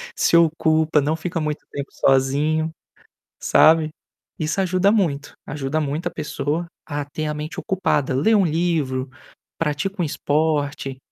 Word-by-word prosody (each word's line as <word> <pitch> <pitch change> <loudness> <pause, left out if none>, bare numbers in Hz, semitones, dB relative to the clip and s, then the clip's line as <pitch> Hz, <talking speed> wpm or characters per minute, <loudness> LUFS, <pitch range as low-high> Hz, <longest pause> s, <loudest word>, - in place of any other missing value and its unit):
se - - +3
ocupa, 160 -1 +3
não 150 +3 0
fica 170 +1 -3
muito 150 -1 -3
tempo 140 -1 -5
sozinho", 145 +4 +2 0.7
sabe. 160 -1 +5 0.5
Isso 155 +5 -1
ajuda 185 +2 +2
muito, 160 -10 0
ajuda 145 +1 -2
muito 150 +3 -2
a - - -3
pessoa 150 +2 -3 0.2
a 145 -1 -3
ter 155 +2 -5
a 150 - -1
mente 150 +1 -5
ocupada. 145 -8 0
Lê 190 +12 +3
um 195 -3 +4
livro, 155 -6 0 0.5
pratica 165 +5 -1
um - - +1
esporte. 145 -2 -1
155 Hz, 140 wpm, -22 LUFS, 145-165 Hz, 0.7 s, sabe